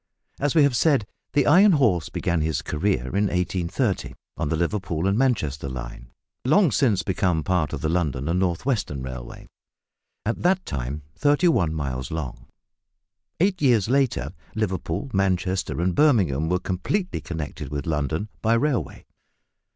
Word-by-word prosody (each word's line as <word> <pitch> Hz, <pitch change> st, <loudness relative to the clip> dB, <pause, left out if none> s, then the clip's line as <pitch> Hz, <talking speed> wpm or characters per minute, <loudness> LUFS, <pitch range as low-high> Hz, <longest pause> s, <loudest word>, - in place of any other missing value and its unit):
As 145 Hz, +1 st, 0 dB
we 155 Hz, -, +6 dB
have 140 Hz, -3 st, +3 dB
said, 140 Hz, -6 st, +3 dB, 0.3 s
the 145 Hz, -2 st, +3 dB
iron 185 Hz, +6 st, +6 dB
horse 110 Hz, -, +2 dB
began 85 Hz, -2 st, -1 dB
his 80 Hz, -2 st, -1 dB
career 75 Hz, -6 st, -1 dB
in 100 Hz, +1 st, +3 dB
1830 90 Hz, -, -1 dB, 0.2 s
on -, -, -2 dB
the 80 Hz, -, +1 dB
Liverpool 85 Hz, -1 st, -1 dB
and 100 Hz, +1 st, +2 dB
Manchester 90 Hz, -, 0 dB
line -, -, -7 dB, 0.3 s
long 160 Hz, +4 st, +4 dB
since 110 Hz, -, +2 dB
become 90 Hz, -3 st, 0 dB
part 90 Hz, -5 st, 0 dB
of 75 Hz, -, -4 dB
the 80 Hz, -, 0 dB
London 75 Hz, -5 st, -1 dB
and 85 Hz, +2 st, +1 dB
North 90 Hz, +2 st, -1 dB
Western 100 Hz, -, -1 dB
Railway 65 Hz, -2 st, -8 dB, 0.8 s
at 115 Hz, -, -2 dB
that 185 Hz, +2 st, +2 dB
time 70 Hz, +3 st, -4 dB
thirty 145 Hz, -, +3 dB
one 85 Hz, -, +2 dB
miles 65 Hz, -4 st, -3 dB
long. 65 Hz, -7 st, -5 dB, 0.9 s
Eight 185 Hz, 0 st, +1 dB
years 120 Hz, -7 st, +3 dB
later, 120 Hz, -, +1 dB, 0.2 s
Liverpool, 95 Hz, -, -2 dB
Manchester, 95 Hz, -2 st, 0 dB
and 90 Hz, +1 st, +1 dB
Birmingham 90 Hz, -, +3 dB
were 90 Hz, -, +2 dB
completely 140 Hz, -, -2 dB
connected 75 Hz, -4 st, -6 dB
with 70 Hz, -1 st, -4 dB
London 80 Hz, +5 st, -1 dB
by 115 Hz, +1 st, +3 dB
railway. 140 Hz, +1 st, -1 dB
90 Hz, 150 wpm, -24 LUFS, 75-125 Hz, 0.9 s, we